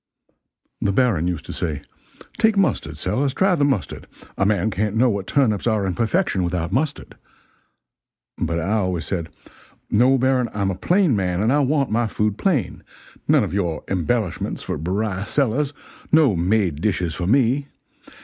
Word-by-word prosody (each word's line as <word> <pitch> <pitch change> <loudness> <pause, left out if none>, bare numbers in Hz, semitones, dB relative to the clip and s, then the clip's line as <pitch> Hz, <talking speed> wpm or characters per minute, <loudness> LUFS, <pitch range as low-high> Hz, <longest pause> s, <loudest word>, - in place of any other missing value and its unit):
The 100 - +1
Baron 100 -7 +2
used 90 -3 -3
to - - -7
say, 75 -4 -3 0.6
'Take 220 -2 +3
mustard, 195 - 0
Sellers, 135 0 -1
try 190 0 +3
the 155 -5 +1
mustard, 135 -8 -1 0.3
a 95 - +1
man 105 0 +1
can't 105 +2 -1
know 120 +2 +3
what 100 -2 -3
turnips 120 -7 +1
are 110 -3 +1
in 95 - -1
perfection 115 - 0
without, 85 0 -2
mustard,' 145 +7 -2 1.2
but 85 0 -2
I 90 +5 -2
always 90 -5 -1
said, 85 -4 -3 0.6
'No, 125 +5 +4
Baron, 130 -2 +1
I'm 100 -2 0
a - - -3
plain 175 - +2
man 90 -3 -1
and 110 +6 +2
I 145 - +3
want 140 -2 +1
my 115 +1 +1
food 105 -1 -1
plain 140 - 0 0.5
none - - +4
of - - -4
your 85 -5 -1
embellishments 95 +2 -1
for - - -4
Beriah 95 +4 -2
Sellers 140 +1 0 0.4
no 150 -9 +5
made 90 -3 +1
dishes 90 -5 0
for 90 +2 -3
me! 135 +4 +2
105 Hz, 165 wpm, -22 LUFS, 90-135 Hz, 1.2 s, no